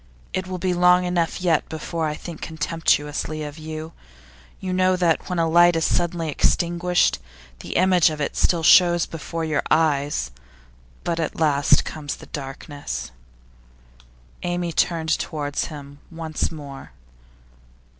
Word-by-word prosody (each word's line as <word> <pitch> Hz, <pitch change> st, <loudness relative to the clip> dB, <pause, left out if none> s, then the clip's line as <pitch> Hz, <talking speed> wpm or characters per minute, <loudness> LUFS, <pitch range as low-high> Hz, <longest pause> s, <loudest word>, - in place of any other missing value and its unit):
It 185 Hz, 0 st, -2 dB
will 185 Hz, 0 st, -4 dB
be 180 Hz, 0 st, 0 dB
long 180 Hz, +1 st, +5 dB
enough 180 Hz, 0 st, -1 dB
yet 165 Hz, -4 st, +2 dB
before 160 Hz, +1 st, -3 dB
I 150 Hz, -, -3 dB
think 165 Hz, 0 st, -9 dB
contemptuously 155 Hz, -1 st, -1 dB
of 150 Hz, +1 st, -7 dB
you. 155 Hz, +1 st, -7 dB, 0.7 s
You 185 Hz, -1 st, -3 dB
know 185 Hz, 0 st, +3 dB
that 175 Hz, -2 st, +1 dB
when 180 Hz, -, -2 dB
a 165 Hz, -1 st, +2 dB
light 175 Hz, +1 st, +5 dB
is 165 Hz, -, +1 dB
suddenly 170 Hz, -1 st, 0 dB
extinguished, 175 Hz, -, +1 dB, 0.4 s
the -, -, -7 dB
image 180 Hz, -2 st, +5 dB
of 155 Hz, -1 st, -5 dB
it 145 Hz, -, -2 dB
still 170 Hz, -2 st, +2 dB
shows 175 Hz, +1 st, +6 dB
before 165 Hz, +1 st, -5 dB
your 155 Hz, -2 st, 0 dB
eyes. 145 Hz, -, +1 dB, 0.7 s
But 170 Hz, -1 st, -1 dB
at 160 Hz, -, -3 dB
last 145 Hz, -3 st, +3 dB
comes 145 Hz, -2 st, -5 dB
the -, -, -13 dB
darkness.' 135 Hz, -, -6 dB, 1.3 s
Amy 175 Hz, -1 st, -2 dB
turned 160 Hz, -1 st, +1 dB
towards 145 Hz, -3 st, -2 dB
him 145 Hz, -2 st, -10 dB
once 160 Hz, -2 st, -3 dB
more. 140 Hz, -4 st, -9 dB
160 Hz, 140 wpm, -23 LUFS, 150-175 Hz, 1.3 s, shows